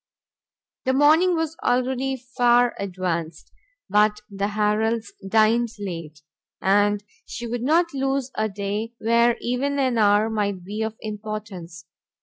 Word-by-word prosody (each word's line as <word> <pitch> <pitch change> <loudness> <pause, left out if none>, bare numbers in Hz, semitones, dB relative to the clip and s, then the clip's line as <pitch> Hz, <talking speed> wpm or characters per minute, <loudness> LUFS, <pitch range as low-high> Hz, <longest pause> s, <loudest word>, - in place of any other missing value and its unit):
The 260 - +2
morning 315 +6 +5
was 325 -1 -2
already 255 +2 +1
far 245 -1 +2
advanced, 180 -4 -4 0.4
but 210 0 +3
the 200 0 -1
Harrels 215 +2 0 0.2
dined 225 +3 +3
late, 165 -6 -7 0.4
and 205 +1 +2 0.2
she 240 - -6
would 235 0 -3
not 330 +6 +2
lose 270 -1 -1
a 215 0 -1
day 205 +3 -4
where 235 +1 +3
even 265 +4 -1
an 255 -4 +1
hour 205 +1 +4
might 205 -4 -2
be 205 +4 -5
of 220 0 -2
importance. 210 -6 -7
220 Hz, 130 wpm, -23 LUFS, 205-250 Hz, 0.4 s, morning